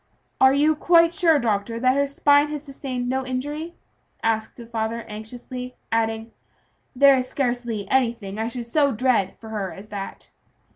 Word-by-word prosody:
"Are 265 0 +7
you 295 +3 +3
quite 335 +1 +4
sure, 340 -5 +4
doctor, 230 -2 -1
that 255 +2 +3
her 280 0 +2
spine 285 +1 +4
has 300 -1 -5
sustained 265 -3 -5
no 265 +1 -1
injury?" 290 +6 -4 0.5
asked 220 -1 0
the 235 - -10
father 225 0 -3
anxiously, 245 +4 -8 0.2
adding, 225 0 -1 0.6
"there 275 +1 +7
is 255 0 -2
scarcely 240 -6 -2
anything 230 -6 0
I 225 - -1
should 240 0 -5
so 280 +3 +2
dread 225 -5 +1
for 220 - -11
her 200 -4 -3
as 205 +2 -11
that." 200 -1 -7
250 Hz, 160 wpm, -23 LUFS, 225-280 Hz, 0.6 s, Are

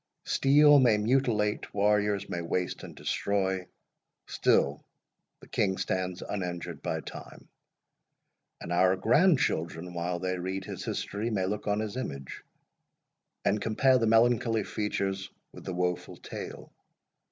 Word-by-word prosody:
Steel 145 +1 +6
may 120 -5 +5
mutilate, 110 -2 +1
warriors 105 0 +2
may 85 - -3
waste 90 +1 -2
and - - -10
destroy—still 95 -6 -1 0.6
the - - -14
King 95 -2 0
stands 90 -1 -2
uninjured 90 -4 -4
by - - -2
time; - - -11 1.1
and 85 - -5
our 90 +1 +4
grandchildren, 95 - +2
while 85 +1 -2
they 90 +1 -2
read 95 +1 -4
his - - -6
history, 105 +3 -3
may 100 -5 0
look 105 +3 -3
on 105 +1 +1
his 110 +2 -4
image, 70 - -6 1.0
and 105 +1 +2
compare 130 +4 +3
the 115 - +1
melancholy 115 -1 +3
features 100 -2 -2 0.2
with - - -12
the 95 - -4
woful 90 0 -2
tale. - - -8
100 Hz, 125 wpm, -29 LUFS, 90-110 Hz, 1.1 s, Steel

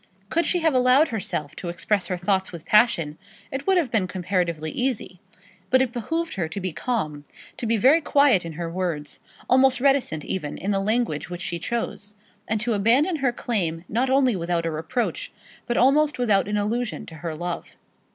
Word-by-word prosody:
Could 335 +1 +1
she 355 - +2
have 320 -2 +3
allowed 255 +4 +4
herself 185 -9 -3
to 175 - -5
express 180 +3 0
her 180 - -2
thoughts 190 +1 0
with 170 -3 -9
passion, 175 -9 +3 0.3
it 270 +4 -5
would 385 -1 +4
have 305 -9 +1
been 200 -5 +1
comparatively 175 -4 -1
easy; 245 -8 -2 0.5
but 260 - +5
it 260 -2 +1
behoved 325 +8 -3
her 175 -5 -2
to 200 - -5
be 185 -1 -3
calm, 155 -10 -2 0.3
to 235 - -3
be 230 0 +2
very 275 +10 +5
quiet 280 - +4
in 165 -1 -6
her 170 +2 -4
words, 165 -4 -3 0.3
almost 260 0 +4
reticent 265 - +1
even 150 -6 -3
in 200 - -2
the 195 - +1
language 210 -6 -1
which 175 -1 -6
she 170 -1 -3
chose, 210 0 -4 0.3
and 220 0 0
to 230 +1 0
abandon 250 - +3
her 265 -4 +1
claim 180 -9 -2
not 245 +5 0
only 265 -3 +3
without 170 -1 -1
a 165 - -1
reproach, 165 +11 -3 0.4
but 240 - 0
almost 290 +3 +4
without 215 -6 +2
an 210 0 -1
allusion 225 +3 -2
to 165 - -11
her 165 0 -5
love. 175 +2 -5
210 Hz, 190 wpm, -24 LUFS, 175-255 Hz, 0.5 s, but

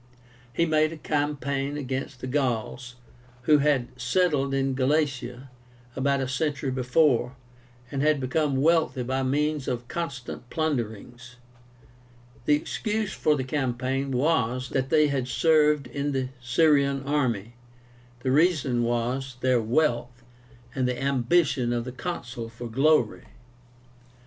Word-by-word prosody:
He 170 +7 +1
made 155 -1 +2
a 165 - -7
campaign 145 -1 -2
against 130 -2 -4
the - - -4
Gauls, 125 -2 -2 0.5
who 150 +3 +5
had 140 -4 +2
settled 140 0 +1
in 135 0 0
Galatia 135 -2 -1 0.4
about 140 +1 +1
a 130 - -1
century 140 +1 -1
before, 125 0 +2 0.6
and 135 -1 -2
had 150 0 +3
become 135 +1 0
wealthy 160 -5 +2
by 130 +2 -1
means 145 +2 0
of 120 -1 -3
constant 135 -7 -5
plunderings. 120 -4 -3 1.1
The 150 - +5
excuse 210 +6 -2
for 150 - +2
the 135 - -2
campaign 130 0 -1
was, 130 -2 0
that 135 0 -1
they 150 -1 +5
had 135 -3 -1
served 150 0 +3
in 140 +3 -3
the 130 -1 -1
Syrian 140 +1 +2
army; 125 -7 -1 0.7
the 130 - 0
reason 145 -5 +2
was, 120 +2 -1
their 130 -2 +3
wealth, 125 0 0 0.5
and 130 -3 0
the 125 -1 -2
ambition 135 -1 +1
of 120 -1 -1
the 125 - -5
Consul 125 -6 -5
for 115 +1 -8
glory. 135 0 +2
135 Hz, 130 wpm, -26 LUFS, 125-150 Hz, 1.1 s, who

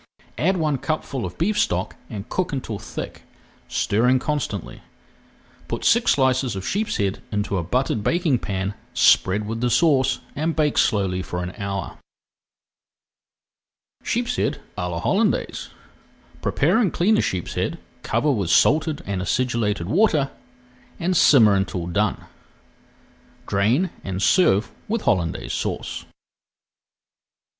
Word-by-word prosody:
Add 185 +4 +2
one 155 -5 0
cupful 140 -5 -3
of - - -11
beef 210 +5 +1
stock - - 0
and 105 -1 -6
cook 185 +6 -2
until 120 -7 -4
thick, 110 - -7 0.5
stirring 125 +5 +2
constantly. 130 - -3 0.9
Put - - -4
six 235 +1 +4
slices 130 -3 +1
of 95 -1 -5
sheepshead 105 - -1
into 105 -1 -1
a 85 - -1
buttered 120 +2 0
baking 165 - +1
pan, 95 0 -3 0.2
spread 100 +3 +4
with 115 +1 -4
the 125 - +2
sauce, 135 -3 +3 0.2
and 160 +3 -1
bake 150 -2 +2
slowly 95 -3 +1
for 90 0 -4
an 90 - -4
hour. 100 -4 -5 2.0
[Page - - -1
359] - - 0
SHEEPSHEAD - - -17
À 90 - -3
LA 85 -1 -3
HOLLANDAISE 210 - 0 0.7
Prepare - - +2
and 210 -7 +2
clean 205 +6 +3
a - - +4
sheepshead, 90 -2 -2 0.2
cover 150 - +1
with 100 -9 -1
salted 150 - +3
and 95 -2 -2
acidulated 105 -4 0
water, 155 - +2 0.7
and 180 +2 0
simmer 115 -10 +6
until 90 -3 -1
done. 100 +3 -1 1.2
Drain 120 - +1
and 95 -1 -4
serve 110 - +3 0.2
with 225 +1 -1
Hollandaise 85 -4 0
Sauce. - - -3
120 Hz, 130 wpm, -23 LUFS, 100-155 Hz, 2.0 s, simmer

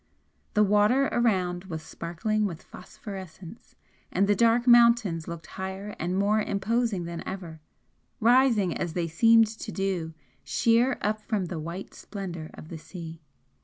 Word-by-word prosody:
The 210 - +5
water 210 +7 +3
around 185 -6 0
was 160 -4 -6
sparkling 210 +8 -2
with 170 -5 -8
phosphorescence 190 0 -11 0.4
and 195 - +2
the 205 - +3
dark 235 +1 +3
mountains 235 -9 +5
looked 170 -1 -7
higher 190 +2 -6
and 180 +3 -1
more 205 +2 +2
imposing 210 -1 -1
than 170 0 -5
ever, 170 -5 -7 0.6
rising 230 -6 +4
as 170 -2 -3
they 170 -1 -1
seemed 225 +7 +5
to 220 0 -7
do 185 -5 -2 0.3
sheer 235 +3 +2
up 215 +1 -1
from 210 -3 -2
the 170 -2 -5
white 170 +5 -7
splendour 175 -6 -7
of 155 - -11
the 165 - -7
sea. 165 -1 -9
195 Hz, 145 wpm, -27 LUFS, 170-225 Hz, 0.6 s, The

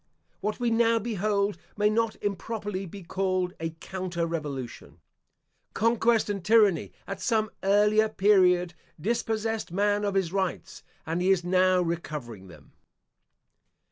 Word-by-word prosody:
What 215 +3 -3
we 240 -1 +1
now 230 0 +3
behold 210 -2 -1 0.2
may 210 0 +3
not 225 +1 +1
improperly 205 -1 -3
be 195 +3 -10
called 185 0 -1
a 165 0 -2
"counter 185 -2 -3
revolution." 140 - -6 0.8
Conquest 230 +1 +2
and 200 -3 -3
tyranny, 210 -6 +3
at 195 -1 -6
some 220 -3 +1
earlier 210 +2 +3
period, 185 -4 +3 0.3
dispossessed 225 +1 -2
man 205 +2 +1
of 200 -1 -1
his 190 -3 0
rights, 190 -2 -3 0.2
and 165 +2 -2
he 185 - +2
is 190 -2 +3
now 185 0 +3
recovering 150 - -5
them. 85 - -16
195 Hz, 130 wpm, -27 LUFS, 175-215 Hz, 0.8 s, now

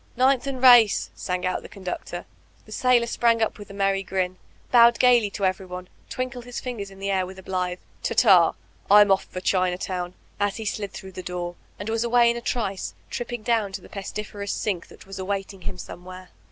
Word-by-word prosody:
^Ninlh 260 +1 +3
and 260 -2 -4
Race/' 240 -5 +7
sang 180 -1 -3
out 185 - -1
the - - -11
conductor. 190 -3 -6 0.4
The - - -15
sailor 250 -2 +3
sprang 235 0 +2
up 220 -1 -1
with 205 - -10
a - - -9
merry 195 -1 +1
grin, 185 -1 -2 0.3
bowed 235 -1 +7
gaily 240 -4 +5
to 200 0 -2
everyone, 185 -1 -3 0.2
twinkled 255 -1 -4
his 245 -1 -5
fingers 230 -6 -5
in 195 - -14
the 195 +1 -2
air 190 -1 +2
with 190 +1 -10
a 190 - -11
blithe 180 -1 -2 0.2
'Ta - - -2
ta; 185 -8 +6 0.4
Vm 205 0 +7
off 195 - +3
for 185 - -7
Chinatown, 180 -1 -1 0.2
as 205 +1 0
he 220 - -6
slid 200 -1 -3
thfOiq;h 190 0 -9
the 185 - -6
door, 175 0 -4 0.2
and 205 - -6
was 225 +1 0
away 235 0 +4
in - - -4
a 235 - -4
trice, 210 -6 -2 0.2
tripping 240 -2 -4
down 225 -4 +1
to 190 - -5
the - - -14
pestiferous 205 0 -5
sink 190 -5 -2
that - - -15
was 195 0 -8
awaiting 195 0 -4
him 180 - -6
somewhere. 185 +1 -10
200 Hz, 205 wpm, -25 LUFS, 185-235 Hz, 0.4 s, Race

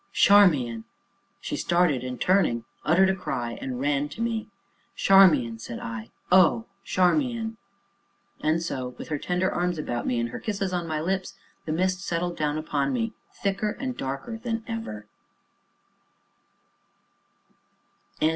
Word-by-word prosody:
"Charmian!" 145 - +5 0.6
She - - -3
started, 170 -7 +2
and, 125 -1 -5
turning, 150 -12 +2 0.2
uttered 190 +5 +4
a - - -1
cry, 120 -10 -4
and 125 -2 -4
ran 145 +1 0
to 150 - -11
me. 225 -2 -2 0.5
"Charmian," 150 -13 +5
said 115 +1 -6
I; 115 0 -6 0.2
"oh, 185 +5 +5 0.2
Charmian!" 225 - +1 0.8
And 160 +2 +1
so, 130 -6 -4
with - - -8
her 150 -2 -1
tender 180 +3 0
arms 175 -1 -1
about 120 -6 -3
me, 120 - +1
and 115 0 -1
her - - -6
kisses 195 -3 -2
on 175 -2 -2
my 155 -1 -1
lips, 185 +3 -2 0.3
the 155 - -3
mist 185 +3 0
settled 175 -2 -2
down 150 0 -1
upon 145 -3 -1
me, 230 -2 -1 0.3
thicker 200 +2 0
and 255 -2 -3
darker 140 - -5
than 230 -1 -3
ever. 225 - -5
175 Hz, 135 wpm, -26 LUFS, 135-195 Hz, 0.8 s, Charmian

